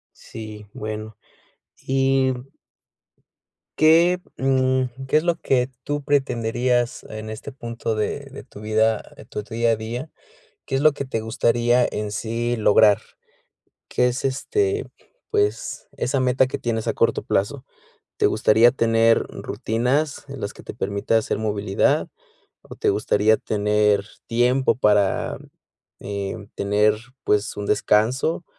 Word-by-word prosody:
Sí, 110 -2 -9
bueno, 110 0 -6 0.7
y 135 0 +2 1.5
¿Qué, 170 +3 +5 0.2
mm, 130 -1 0
qué 145 - +3
es 155 - +1
lo 170 -1 +2
que 125 -3 +1
tú 145 +1 -3
pretenderías 120 -3 0
en 110 0 -7
este 110 +6 -7
punto 115 -3 -4
de 110 +6 -2
de 140 - -9
tu 120 - -14
vida 110 0 +2 0.3
tu - - -4
día 115 +1 0
a - - +3
día? 115 +7 -5 0.6
¿Qué - - -4
es 135 - +2
lo 155 +1 +5
que 140 - -5
te 130 -4 -3
gustaría 120 +2 +2
en 105 0 -3
sí 115 +3 -2
lograr? 105 -1 +5 0.9
¿Qué 125 - +2
es, 125 +3 -2
este, 400 - 0 0.4
pues, 415 -1 -1
esa 135 +2 0
meta 130 +1 +3
que - - -4
tienes 115 -2 -2
a - - +1
corto - - +1
plazo? 125 +7 -1 0.5
¿Te - - +3
gustaría 110 +2 +4
tener 115 -2 +3
rutinas 130 +7 -1
en 135 -1 -8
las 100 +1 -4
que - - -14
te - - -8
permita 100 +1 -1
hacer 110 - 0
movilidad, 105 -2 +1 0.5
o - - -12
te - - +1
gustaría 110 +1 +2
tener 105 -1 +1 0.2
tiempo 125 +3 +2
para, 105 -5 +2 0.6
eh, 100 +1 -5
tener, 105 +1 +2 0.3
pues, 105 0 0
un 105 - -4
descanso? 120 - +1
115 Hz, 135 wpm, -23 LUFS, 110-130 Hz, 1.5 s, Qué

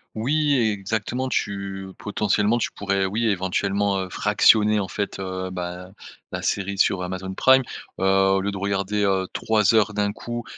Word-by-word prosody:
Oui 145 +6 +1
exactement 110 +3 -1
tu 100 -5 -3
potentiellement 105 +2 0
tu - - -1
pourrais 100 -1 0
oui, 110 +4 -1
éventuellement 100 0 0
fractionner 105 +1 +4
en 100 - -2
fait, 100 +1 -4
heu, 95 -1 -4
ben, 90 0 -6 0.4
la - - -5
série 100 0 -1
sur 95 -1 +2
Amazon 95 +1 -5
Prime. 130 +6 +5 0.4
Heu, - - -2
au 95 0 +3
lieu 100 +1 -2
de 100 - -6
regarder, 100 +1 -1
heu, 95 -1 +1
3 110 -1 +2
heures 105 -2 +2
d'un 105 -1 0
coup, 120 +2 -6
100 Hz, 160 wpm, -23 LUFS, 95-105 Hz, 0.4 s, Prime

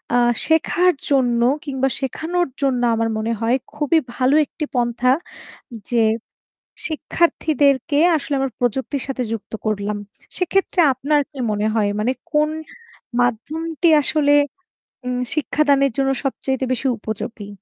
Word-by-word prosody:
আ - - +5 0.3
শেখার 340 +3 +3 0.2
জন্য 245 -4 +2 0.2
কিংবা 270 -1 0
শেখানোর 330 +6 -1
জন্য 260 -3 +1
আমার 225 0 0
মনে 220 +1 -1
হয় 235 +3 +2 0.2
খুবই 300 +2 +2 0.2
ভালো 260 +3 +3
একটি 300 - -5
পন্থা। 245 +1 +2 0.8
যে 235 -2 +2 0.9
শিক্ষার্থীদেরকে 300 -3 +1 0.2
আসলে 290 -1 -2
আমার 270 -1 -1
প্রযুক্তির 265 +3 -1
সাথে 260 -2 -2
যুক্ত 225 -2 -5
করলাম। 210 -1 -1 0.4
সেক্ষেত্রে 370 0 +1
আপনার 290 +3 +1
কি 275 - -10
মনে 210 +1 0
হয়? 210 -2 +2
মানে 235 +4 +1 0.2
কোন 300 0 +3 0.7
মাধ্যমটি 315 +8 -1 0.2
আসলে 290 0 +2 0.7
উম 250 0 -1 0.2
শিক্ষাদানের 280 -3 +2
জন্য 270 -1 +2 0.2
সবচাইতে 265 -1 -1
বেশি 260 +2 -2
উপযোগী। 220 -1 -6
270 Hz, 125 wpm, -20 LUFS, 240-300 Hz, 0.9 s, আ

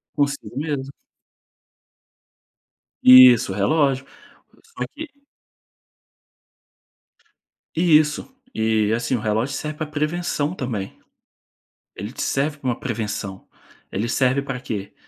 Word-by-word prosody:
Consigo 140 -2 -2
mesmo. 140 -2 -3 2.1
Isso, 125 -4 +8
o - - -4
relógio. 135 +6 +1 0.6
Só 460 - -7
que 315 +2 -7 2.7
Isso. 155 - +3 0.2
E, 110 -1 +1
assim, 120 +2 0
o - - -2
relógio 110 +6 -1
serve 150 +1 -5
para 155 - -3
prevenção 150 +1 -2
também. 115 - -5 1.0
Ele 105 +4 -7
te - - -9
serve 145 +2 -1
para 135 - -9
uma 120 - -1
prevenção. 105 -5 -4 0.5
"Ele 105 +5 -2
serve 130 +2 +1
para 125 -2 -5
quê?" 105 -5 -5
135 Hz, 105 wpm, -22 LUFS, 110-150 Hz, 2.7 s, Isso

